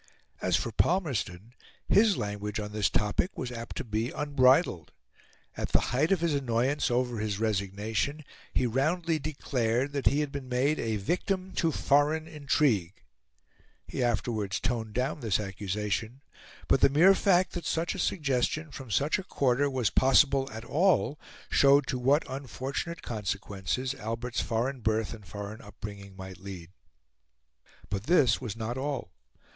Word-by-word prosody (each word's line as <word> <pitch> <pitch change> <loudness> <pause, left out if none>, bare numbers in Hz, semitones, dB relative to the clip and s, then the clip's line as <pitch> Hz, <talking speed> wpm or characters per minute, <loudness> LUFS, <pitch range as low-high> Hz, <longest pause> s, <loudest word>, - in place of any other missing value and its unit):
As 90 -2 +2
for 100 +5 -1
Palmerston, 120 - 0 0.3
his 210 -1 +4
language 105 +1 -3
on 105 -1 -5
this 105 -1 +1
topic 105 - 0
was 125 - -4
apt 115 -1 -7
to - - -3
be 110 0 -2
unbridled. 135 - +2 0.6
At - - -4
the - - +6
height 150 +7 +2
of 190 -4 +2
his 170 -3 +1
annoyance 135 +1 +1
over 120 -1 0
his 105 -2 -2
resignation, 110 +7 -1 0.3
he 130 - +1
roundly 155 +7 +1
declared 135 -3 -1
that 140 -1 0
he 145 +2 +3
had 145 -2 -2
been 140 -3 -6
made 135 +5 +1
a 110 -1 -1
victim 185 - -1
to 165 -2 +2
foreign 150 +3 +2
intrigue. 135 - 0 0.8
He - - -3
afterwards 110 -4 -1
toned 115 -3 -2
down 130 +5 -1
this 110 -6 +1
accusation; 105 +5 -3 0.4
but - - +3
the - - +7
mere 165 +8 +6
fact 185 -2 +3
that 175 - -4
such 165 +1 0
a 195 - -6
suggestion 150 -1 0
from 135 -3 -9
such 145 - +1
a - - -5
quarter 140 -4 +1
was 130 -6 0
possible 135 +1 +4
at 110 +1 -7
all 165 -2 +2 0.3
showed 140 0 +5
to 125 - -2
what 140 +5 +3
unfortunate 135 +5 -5
consequences 105 +3 -3
Albert's 120 0 -3
foreign 125 +4 -1
birth 110 -1 0
and 105 -4 -12
foreign 100 +4 -7
upbringing 100 -1 -9
might 95 -2 -9
lead. 90 -3 -9 1.2
But 100 +1 -2
this 135 -9 +4
was 115 -5 -4
not 115 +3 -4
all. 135 -8 -3
125 Hz, 150 wpm, -29 LUFS, 105-145 Hz, 1.2 s, the